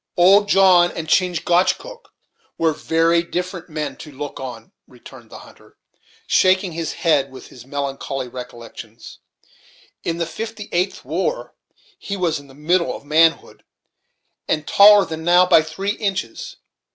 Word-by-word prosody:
"Old 200 +4 +5
John 185 -3 +5
and 160 -1 -5
Chingachgook 180 - 0 0.5
were 165 -1 +1
very 165 +3 +1
different 180 +1 -5
men 155 -1 -4
to 150 - -11
look 145 +1 -7
on," 120 -4 -8 0.2
returned - - -15
the - - -11
hunter, - - -18 0.5
shaking 185 0 +2
his 165 -1 -4
head 145 -5 +1
at 130 - -11
his 125 0 -15
melancholy 135 -1 -4
recollections. 120 -2 -11 0.8
"In 165 0 -2
the 170 - -1
'fifty 220 +4 -7
eighth 180 +3 -2
war' - - -3 0.5
he 200 - -5
was 170 -5 -1
in 140 - -16
the 135 - -17
middle 170 +4 0
of - - -12
manhood, 160 +2 +1 0.8
and 155 -1 -1
taller 205 0 +6
than 160 0 -7
now 175 +2 +5
by 165 - +5
three 160 +6 -4
inches. 205 - -4
170 Hz, 140 wpm, -20 LUFS, 145-185 Hz, 0.8 s, taller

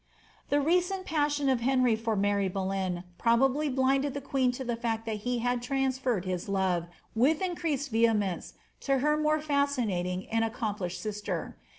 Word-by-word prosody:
The 290 - +3
recent 360 +5 +1
passion 295 -3 +1
of 260 -2 +3
Henry 255 -2 +3
for 225 0 -1
Mary 200 0 +1
Boleyn 190 -2 -2 0.2
probably 270 +6 +3
blinded 270 +1 +1
the - - -1
queen 265 -2 +1
to 260 - -5
the 240 -2 -1
fact 225 -1 -2
that 220 -2 -2
he 250 0 +1
had 245 0 +1
transferred 260 -5 0
his 185 0 -3
love, 185 -3 +1 0.3
with 275 +8 +3
increased 320 -8 -2
vehe 225 -1 +4
mence, 195 -4 -3 0.3
to 275 -1 +1
her 300 +3 +2
more 305 0 +2
foscinating 245 -12 0
and 225 0 +2
accomplished 210 -6 -3
sister. 210 -1 -4
245 Hz, 165 wpm, -29 LUFS, 205-280 Hz, 0.3 s, vehe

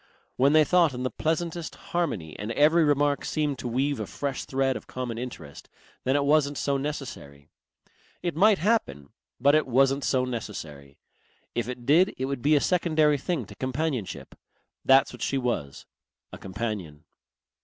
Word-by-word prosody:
When 140 +3 +3
they 155 0 +7
thought 165 -2 +3
in 125 - -4
the 130 - -1
pleasantest 165 +1 -2 0.2
harmony 110 - -2
and 105 +3 -4
every 155 +6 +4
remark 145 -1 +2
seemed 150 -3 -1
to - - -4
weave 135 +2 0
a 105 - -4
fresh 140 -2 -4
thread 135 0 0
of - - -8
common 125 -3 -5
interest, 120 - -8 0.4
then 130 +2 +2
it 145 - +2
wasn't 145 -1 +2
so 140 +3 0
necessary. 125 - -6 0.7
It 175 -3 -2
might 205 +4 +5
happen, 165 - 0 0.3
but 140 +3 +4
it 155 -2 +3
wasn't 135 +2 +3
so 130 -1 +1
necessary.... 80 - -7 0.6
If 120 0 -2
it 125 -1 -7
did 170 +9 +4
it 130 - -2
would 135 -2 -3
be 150 +3 +4
a 145 - +3
secondary 155 -4 +2
thing 155 - -2
to 100 - -12
companionship. 130 - -3 0.5
That's 135 +1 +5
what - - -11
she 135 - 0
was, 120 - -3 0.5
a - - -8
companion. 95 -7 -5
135 Hz, 165 wpm, -26 LUFS, 120-150 Hz, 0.7 s, they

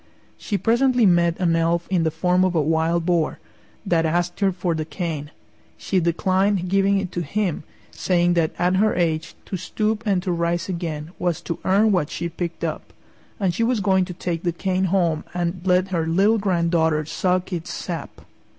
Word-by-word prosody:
She 205 - -3
presently 240 +2 +3
met 175 -2 +3
an 170 -3 +2
elf 165 +1 +1
in 180 -3 +2
the 160 - +2
form 180 +3 +1
of 185 -1 +1
a 160 - +3
Wild 165 +2 +1
Boar, 170 -3 +1 0.5
that 170 -4 +2
asked 175 +2 -1
her 195 -2 +3
for 180 -1 -2
the 160 -1 -2
cane. 155 -2 -4 0.5
She 190 - 0
declined 185 +3 +1
giving 195 +1 +3
it 195 -2 -3
to 175 - -3
him, 180 +2 -1 0.3
saying 175 -1 +1
that 165 -2 +2
at 180 +1 +2
her 215 +2 +2
age 165 -2 -1
to 190 - -4
stoop 215 +4 -2
and 190 -3 +1
to 185 - -1
rise 170 0 -1
again 165 -4 -4
was 175 -2 0
to 170 -1 -5
earn 205 +3 +3
what 180 -7 +1
she 170 +1 -4
picked 170 0 -5
up, - - -4 0.5
and 190 -4 +1
she 205 - -3
was 235 -1 +1
going 190 -1 +2
to 180 - -7
take 170 -2 -3
the 175 - 0
cane 185 +2 -1
home 170 -4 +1
and 175 0 -2
let 185 0 +2
her 165 -3 -1
little 200 +7 +3
granddaughter 170 -5 +1
suck 180 +3 -1
its 170 -1 -4
sap. 170 -3 -6
175 Hz, 190 wpm, -22 LUFS, 165-190 Hz, 0.5 s, presently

